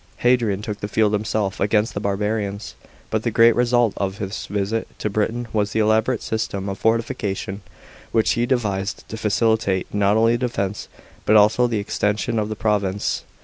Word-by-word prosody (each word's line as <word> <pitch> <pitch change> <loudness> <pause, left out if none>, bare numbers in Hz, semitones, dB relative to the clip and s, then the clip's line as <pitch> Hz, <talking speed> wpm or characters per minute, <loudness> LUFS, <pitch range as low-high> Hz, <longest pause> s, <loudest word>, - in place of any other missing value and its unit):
Hadrian 115 -5 +2
took 105 -2 -4
the 105 - -4
field 105 0 +2
him 105 0 0
self 105 -3 -2
against 105 +2 +1
the - - -3
barbarians, 100 0 -2 0.4
but - - +1
the - - -1
great 115 0 +5
result 120 -2 +2
of 95 0 -2
his 100 0 -5
visit 105 +2 -2
to 105 - -3
Britain 115 +3 -1
was 105 -1 0
the 110 - +1
elaborate 110 +2 +2
system 110 -3 -3
of 95 -1 -5
fortification 110 -3 -1 0.5
which 110 - +2
he 120 +1 +1
devised 100 -6 -1
to - - -5
facilitate 110 -3 0
not 105 +1 +3
only 115 +1 +4
the 125 +1 -1
defence, 100 -4 -3 0.4
but 110 - +3
also 110 +4 +5
the 115 -2 -1
extension 105 +2 -1
of 105 0 -2
the 110 - -3
province. 105 -2 -1
105 Hz, 180 wpm, -22 LUFS, 100-115 Hz, 0.5 s, great